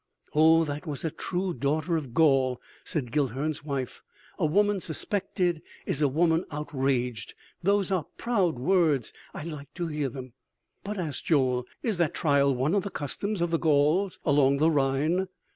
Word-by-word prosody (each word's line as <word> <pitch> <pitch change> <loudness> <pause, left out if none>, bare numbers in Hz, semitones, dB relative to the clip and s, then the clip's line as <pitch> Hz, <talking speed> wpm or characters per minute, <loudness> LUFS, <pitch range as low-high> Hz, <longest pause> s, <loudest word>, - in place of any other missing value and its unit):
"O, 160 +2 +6
that 150 +2 -5
was 145 +1 -4
a 160 - -1
true 180 +3 -2
daughter 155 +3 0
of 145 -6 -3
Gaul!" 135 -5 +3 0.2
said 140 -9 -3
Guilhern's 145 +3 -1
wife. 140 -4 -4 0.4
"A - - +2
woman 205 +4 +2
suspected 175 0 -1 0.2
is 145 - 0
a 145 - +5
woman 165 +4 +2
outraged. 130 -6 -2 0.3
Those 200 +1 +2
are 180 -6 0
proud 195 - +1
words.... 150 - +2 0.2
I - - -5
like 150 -3 -7
to 175 - -2
hear 150 -3 -1
them!" 130 -1 -9 0.5
"But," 210 +1 -4
asked 155 -7 -4
Joel, 130 -5 +2 0.2
"is 215 -7 -1
that 170 -4 +1
trial 140 -3 +3
one 135 +7 0
of 205 - +3
the 200 - -5
customs 190 +5 -3
of 170 -1 0
the 165 - +1
Gauls 160 +5 +2
along 140 -2 +4
the 155 +3 +3
Rhine?" 150 +6 +1
155 Hz, 165 wpm, -27 LUFS, 140-175 Hz, 0.5 s, O